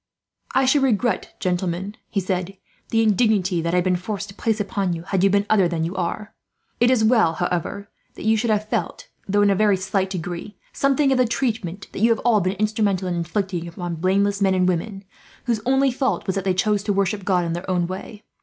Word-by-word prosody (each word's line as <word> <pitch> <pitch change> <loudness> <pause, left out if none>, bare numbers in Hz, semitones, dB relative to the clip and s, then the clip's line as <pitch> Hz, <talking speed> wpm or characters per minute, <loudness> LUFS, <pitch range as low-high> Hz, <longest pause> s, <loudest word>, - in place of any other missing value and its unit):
"I 265 - +4
should 275 +2 +3
regret, 240 -5 0
gentlemen," 185 +2 -2
he 200 - -1
said, 185 0 -3 0.3
"the 225 0 +2
indignity 205 -5 +2
that 170 +2 -1
I - - +3
have 180 - +3
been 185 0 +2
forced 200 +2 -4
to - - -10
place 220 +1 -1
upon 200 -3 -1
you, 165 0 -5
had 190 0 -1
you 195 - +5
been 200 +1 +2
other 200 -5 +4
than 170 -2 -2
you 170 +3 -3
are. 190 +4 -3 0.5
It 240 - +4
is 250 -4 +3
well, 220 -7 +4
however, 180 +3 -3 0.3
that - - -8
you 220 0 +4
should 230 +2 0
have 215 0 +1
felt, - - -3 0.2
though 205 +1 +3
in 200 - +4
a - - +2
very 205 0 +3
slight 195 0 -1
degree, 180 +2 -6 0.2
something 275 0 +2
of 260 - +2
the 250 - +4
treatment 220 -7 -2
that - - -6
you 225 +3 +4
have 230 - +2
all 225 -4 +4
been 185 +1 0
instrumental 205 -2 0
in 180 - -1
inflicting 175 +1 -2
upon 175 0 -5
blameless 200 +3 +1
men 190 -1 +3
and 185 -1 +2
women, 195 +3 -2 0.4
whose 230 -4 -1
only 270 +1 +3
fault 260 +1 -1
was 190 - -1
that 195 - -2
they 185 -1 +1
chose 205 +2 +1
to 205 - +1
worship 200 +1 0
God 180 -2 +1
in 165 - -2
their 175 +2 -5
own 180 -2 +1
way. 190 +4 -7
195 Hz, 230 wpm, -22 LUFS, 180-220 Hz, 0.5 s, you